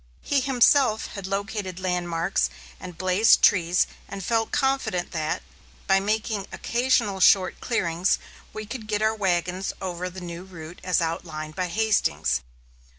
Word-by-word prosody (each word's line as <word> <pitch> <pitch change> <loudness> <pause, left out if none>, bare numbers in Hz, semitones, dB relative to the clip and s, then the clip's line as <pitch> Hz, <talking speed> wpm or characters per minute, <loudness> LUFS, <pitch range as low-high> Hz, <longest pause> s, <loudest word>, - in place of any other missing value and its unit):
He 285 - +2
himself 255 -3 +3
had 200 -2 -6
located 195 -2 -3
landmarks 175 -1 0 0.3
and 180 -2 -9
blazed 185 +4 +4
trees 175 -2 +4 0.2
and 195 -2 -7
felt 225 -1 0
confident 265 -10 0
that, 155 -2 -2 0.4
by 195 0 +4
making 210 0 -1
occasional 235 -5 0
short 185 0 +4
clearings, 175 -6 +1 0.3
we 215 - -6
could 225 0 -7
get 210 0 0
our 220 0 +3
wagons 185 -2 -1
over 180 -1 -4
the 185 +1 -9
new 175 -1 -7
route 170 -2 -11
as 180 -2 +1
outlined 160 -2 -4
by 185 -1 -1
Hastings. 215 - +1
190 Hz, 140 wpm, -25 LUFS, 175-215 Hz, 0.4 s, blazed